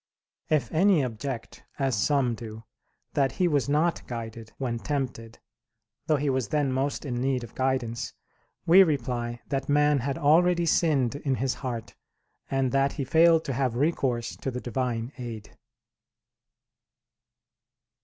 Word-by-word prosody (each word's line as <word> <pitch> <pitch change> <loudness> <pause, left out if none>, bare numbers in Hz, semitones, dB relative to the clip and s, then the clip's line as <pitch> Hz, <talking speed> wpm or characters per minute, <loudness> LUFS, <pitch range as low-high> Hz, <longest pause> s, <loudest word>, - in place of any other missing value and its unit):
If 155 -3 +1
any 175 -1 +4
object, 120 0 -5
as 135 -3 +1
some 130 +2 +2
do, 110 -1 -8 0.5
that 140 -3 +1
he 180 - +1
was 145 -4 +1
not 160 +4 +2
guided, 115 -1 -7
when 120 -3 -2
tempted, 125 -5 -4 0.7
though 155 - +4
he 145 0 -1
was 130 -4 0
then 145 +2 0
most 135 +3 -1
in 125 -3 -2
need 130 -2 0
of 115 - -10
guidance, 130 -3 -1 0.5
we 180 +4 +8
reply 120 -7 0
that 135 0 -2
man 145 0 +4
had 135 +2 -2
already 170 +3 +4
sinned 150 -7 +2
in 140 -2 -1
his 130 0 0
heart, 120 -4 -5 0.6
and 135 -2 +1
that 135 0 +2
he 140 - -3
failed 165 +4 +4
to 135 - -2
have 130 -2 0
recourse 130 -4 0
to - - -3
the 125 -1 -4
Divine 120 -1 -2
aid. 115 -4 -7
135 Hz, 145 wpm, -27 LUFS, 120-145 Hz, 0.7 s, we